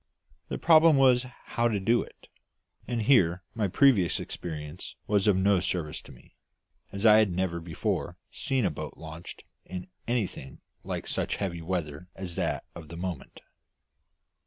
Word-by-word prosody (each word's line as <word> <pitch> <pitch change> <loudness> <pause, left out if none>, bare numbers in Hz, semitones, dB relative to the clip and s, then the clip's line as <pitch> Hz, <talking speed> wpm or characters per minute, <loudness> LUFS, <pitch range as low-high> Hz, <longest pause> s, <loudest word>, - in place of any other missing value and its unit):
The - - -3
problem 160 -2 +6
was 125 -2 +4 0.2
how 120 0 +1
to 110 -3 0
do 115 +5 +3
it; - - -13 0.6
and 120 -2 -1
here 95 -8 +4
my 110 -3 0
previous 100 - +4
experience 75 0 -7
was 105 -1 +2
of 105 - +5
no 95 0 +3
service 85 -4 -2
to - - -14
me, - - -18 0.6
as 100 +2 -3
I 105 -1 +8
had 110 -2 +3
never 90 -1 -1
before 80 -1 -3
seen 130 -4 0
a - - +1
boat - - -7
launched 80 +2 -9 0.2
in 90 +1 -7 0.2
anything 105 - -3 0.2
like - - -4
such - - -1
heavy 85 -4 -3
weather 80 -2 -4
as 95 -2 -5
that - - -1
of 80 -2 -10
the 85 +2 -9
moment. 90 -4 -6
95 Hz, 160 wpm, -28 LUFS, 85-115 Hz, 0.6 s, I